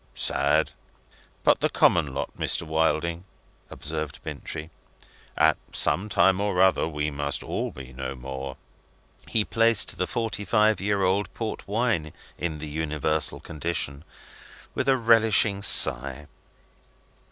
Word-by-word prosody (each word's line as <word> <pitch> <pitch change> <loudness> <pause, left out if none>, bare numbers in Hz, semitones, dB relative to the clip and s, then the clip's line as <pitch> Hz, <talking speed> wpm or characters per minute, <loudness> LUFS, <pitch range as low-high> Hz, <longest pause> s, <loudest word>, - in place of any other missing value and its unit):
"Sad. - - 0 0.7
But - - +4
the - - +1
common 80 -5 +2
lot, 65 - -5
Mr. - - -2
Wilding," 80 +2 -1 0.5
observed 75 -1 -5
Bintrey. 80 0 -7 0.7
"At - - +4
some 105 +4 +1
time 95 0 +3
or 100 -3 -1
other 95 -3 +3
we 75 -1 -3
must 70 0 -3
all - - -3
be 65 -1 -11
no 65 +1 -6
more." 65 +1 -7 0.7
He 110 -2 0
placed 115 -2 +2
the 90 - 0
forty 115 -3 -3
five 105 -1 +2
year 100 0 0
old 95 +2 0
port 115 -2 -5
wine 105 -7 -1 0.2
in 80 -3 -4
the 75 +1 -7
universal 75 0 -1
condition, 75 -3 -4 0.7
with 135 - -1
a 135 - +4
relishing 110 -4 +3
sigh. 65 -4 +6
85 Hz, 130 wpm, -25 LUFS, 75-105 Hz, 0.7 s, sigh